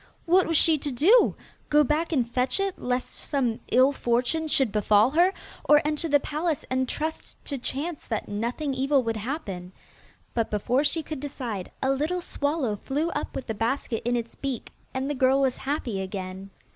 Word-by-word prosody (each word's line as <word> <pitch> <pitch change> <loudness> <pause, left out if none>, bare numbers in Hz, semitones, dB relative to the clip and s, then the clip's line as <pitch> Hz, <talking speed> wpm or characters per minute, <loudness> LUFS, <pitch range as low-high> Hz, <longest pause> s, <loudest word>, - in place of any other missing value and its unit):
What 365 +3 +4
was 330 -1 +2
she 320 -1 +4
to 285 - -3
do? 370 - +5 0.3
Go 300 0 +5
back 305 +4 0
and 255 -7 +1
fetch 250 +7 +1
it, 390 -1 -1
lest 250 0 -2
some 250 -6 -1
ill 260 +2 +6
fortune 255 +5 0
should 270 -6 +2
befall 210 +3 +4
her, 350 +5 +4 0.3
or 295 - +6
enter 305 +2 0
the 290 0 +5
palace 305 +2 -2
and 260 0 +1
trust 315 +1 -4
to 280 -3 -3
chance 290 +6 -3
that 220 -3 -3
nothing 240 +8 -2
evil 270 +1 +2
would 225 -1 -1
happen? 205 - -5 0.6
But 230 -2 0
before 240 +6 +1
she 320 +2 +1
could 305 -1 -6
decide, 245 -9 -5
a 265 - +3
little 305 +7 0
swallow 285 -9 -1
flew 300 - -2
up 295 - -4
with 260 - -4
the 220 - -3
basket 225 +1 -1
in 240 +1 +1
its 235 -1 -3
beak, 270 -4 -5 0.2
and 260 +1 -2
the 290 - -1
girl 265 0 +3
was 265 -2 +1
happy 265 -8 -2
again. 190 0 -6
270 Hz, 185 wpm, -26 LUFS, 235-300 Hz, 0.6 s, ill